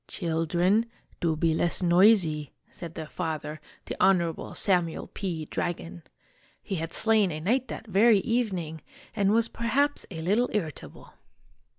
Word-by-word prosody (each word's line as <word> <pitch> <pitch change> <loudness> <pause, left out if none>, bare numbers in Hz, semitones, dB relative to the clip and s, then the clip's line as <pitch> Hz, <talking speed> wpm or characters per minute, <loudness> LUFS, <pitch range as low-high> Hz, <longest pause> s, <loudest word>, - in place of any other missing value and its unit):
" - - -51
Children, 175 +5 +1 0.3
do 165 -2 0
be 160 +1 +1
less 170 +3 0
noisy! 175 -4 +4
" - - -37
said 165 -2 -9
their 160 - -5
father, 155 -2 -5 0.2
the - - -5
Honorable 170 -4 +1
Samuel 175 -5 +1
P. 170 -6 -5
Dragon. 85 - -4 0.6
He 195 - -3
had 165 +1 -4
slain 215 -3 +3
a 155 - -4
knight 245 +10 0
that 225 - -7
very 215 +2 +4
evening 185 -10 -2 0.3
and 200 -2 +2
was 230 +1 +3
perhaps 270 +7 -1
a 160 -4 -6
little 215 +8 +2
irritable. 165 -9 -5
175 Hz, 150 wpm, -27 LUFS, 160-215 Hz, 0.6 s, noisy